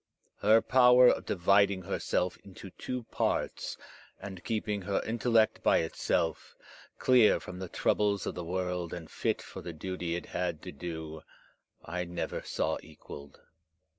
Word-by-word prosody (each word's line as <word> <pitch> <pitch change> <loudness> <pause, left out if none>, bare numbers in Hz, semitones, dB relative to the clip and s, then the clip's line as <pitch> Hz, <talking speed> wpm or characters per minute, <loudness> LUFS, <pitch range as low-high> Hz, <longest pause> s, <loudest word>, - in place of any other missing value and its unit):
Her 110 +2 +5
power 125 -1 +7
of - - 0
dividing 100 +1 +3
herself 90 -1 -1
into 95 0 -11
two 125 +5 -5
parts, - - -1 0.4
and 95 -3 -8
keeping 105 -2 -2
her 100 +1 0
intellect 115 -1 +2
by - - +4
itself, 80 0 -1 0.4
clear 125 -4 +5
from 90 - -9
the 95 -2 -6
troubles 100 +1 +1
of - - -2
the 90 - -5
world 90 0 -3
and 80 -3 -9
fit - - -1
for - - -9
the 85 - -7
duty 85 +1 -4
it 85 - -5
had 90 -3 -3
to - - -6
do, 80 0 -6 0.6
I 90 +2 -3
never 85 0 -4
saw - - -1
equalled. 70 -2 -12
90 Hz, 145 wpm, -30 LUFS, 85-105 Hz, 0.6 s, power